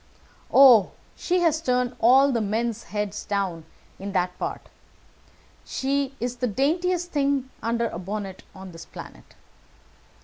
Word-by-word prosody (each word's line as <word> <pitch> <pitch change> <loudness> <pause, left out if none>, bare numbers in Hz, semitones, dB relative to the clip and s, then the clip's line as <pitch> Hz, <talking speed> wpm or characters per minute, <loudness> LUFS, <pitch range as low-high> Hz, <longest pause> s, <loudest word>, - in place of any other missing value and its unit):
"Oh, 245 -8 +7 0.2
she 360 0 0
has 320 -2 +2
turned 250 -3 0
all 265 +5 +5
the 235 -3 0
men's 225 +2 -2
heads 210 -1 -4
down 190 -5 -2 0.3
in 195 +1 -6
that 180 -1 0
part. - - -5 1.0
She 275 0 -2
is 245 +2 -3
the 250 - -1
daintest 345 - 0
thing 275 -2 0
under 235 0 0
a 175 - -6
bonnet 195 0 -5
on 190 -1 -10
this 165 0 -11
planet. - - -12
235 Hz, 135 wpm, -25 LUFS, 200-275 Hz, 1.0 s, Oh